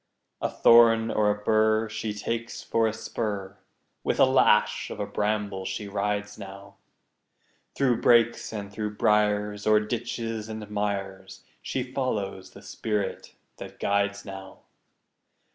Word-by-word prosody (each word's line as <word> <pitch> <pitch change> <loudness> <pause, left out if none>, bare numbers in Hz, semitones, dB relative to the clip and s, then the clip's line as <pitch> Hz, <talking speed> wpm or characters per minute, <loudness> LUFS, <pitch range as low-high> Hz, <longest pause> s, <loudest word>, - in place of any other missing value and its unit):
A - - 0
thorn 115 -1 +5
or 105 -1 +2
a 105 - +1
bur 110 +1 +3
She 110 0 -4
takes 115 +3 -4
for 115 -1 +1
a - - 0
spur; 100 -3 -4 0.4
With - - -1
a - - +8
lash 130 -5 +3
of - - -7
a - - -1
bramble 105 -2 -2
she 95 +2 -4
rides 105 +1 -2
now, 100 0 -11 1.0
Through 130 -4 +1
brakes 120 -1 +3
and 100 -2 -6
through 105 0 -4
briars, 105 -1 +1
O'er 110 0 +6
ditches 115 0 -4
and 110 -1 -6
mires, 100 -2 -4 0.2
She 130 - -2
follows 105 -8 -3
the - - -15
spirit 105 -3 -3 0.2
that - - -10
guides 100 0 0
now. 95 -1 -9
105 Hz, 135 wpm, -26 LUFS, 100-115 Hz, 1.0 s, a